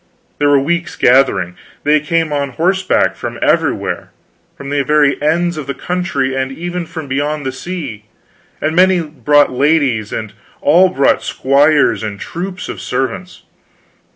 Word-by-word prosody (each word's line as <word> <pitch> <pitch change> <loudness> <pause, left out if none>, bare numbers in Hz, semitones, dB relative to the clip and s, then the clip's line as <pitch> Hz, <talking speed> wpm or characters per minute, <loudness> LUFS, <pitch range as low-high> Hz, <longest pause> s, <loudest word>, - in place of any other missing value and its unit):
They 145 - +3
were 145 -1 +5
weeks 170 +4 -2
gathering. 125 -9 +3 0.3
They 150 +1 +4
came 160 0 -1
on 140 -2 -2
horseback 185 +6 +1
from - - -6
everywhere; - - 0 0.5
from 140 0 -7
the 145 -1 +1
very 145 0 +2
ends 170 +3 +1
of 150 -3 -6
the 140 - -3
country, 175 -7 -2
and 135 0 -2
even 175 +3 -5
from 160 -3 -7
beyond 145 +2 -2
the 130 - -1
sea; 135 - -6 0.5
and 155 +1 -1
many 185 0 +4
brought 145 -1 +2
ladies, 130 -5 +1
and 110 -2 -5 0.3
all 175 +6 +5
brought 140 -7 +2
squires 140 +2 +2
and 105 -2 -5
troops 185 - -6
of - - -6
servants. 135 +8 -4
145 Hz, 150 wpm, -16 LUFS, 135-170 Hz, 0.5 s, were